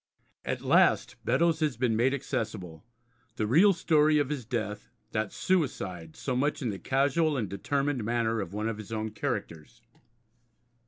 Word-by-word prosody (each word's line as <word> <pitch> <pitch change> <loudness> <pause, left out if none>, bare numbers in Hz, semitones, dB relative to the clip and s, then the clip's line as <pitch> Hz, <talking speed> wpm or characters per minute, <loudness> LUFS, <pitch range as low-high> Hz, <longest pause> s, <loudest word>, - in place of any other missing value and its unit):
At - - -3
last - - +3
Beddoes 165 -2 +2
has 150 -7 0
been 120 -2 +1
made 120 +4 +3
accessible, 110 - -4 0.5
the 110 - -1
real 165 - +6
story 155 -3 +3
of 145 -2 +1
his 140 -6 -3
death, 110 -3 -4 0.2
that 110 -2 -1
suicide 95 - -1
so 130 - -3
much 145 +4 0
in 120 - 0
the 95 - -6
casual 145 - +1
and 110 -5 -1
determined 135 +6 -1
manner 115 -1 0
of 95 - -6
one 105 +2 -2
of 110 -1 -3
his 110 0 -9
own 110 -1 -3
characters. 110 - -5
120 Hz, 160 wpm, -29 LUFS, 105-145 Hz, 0.5 s, real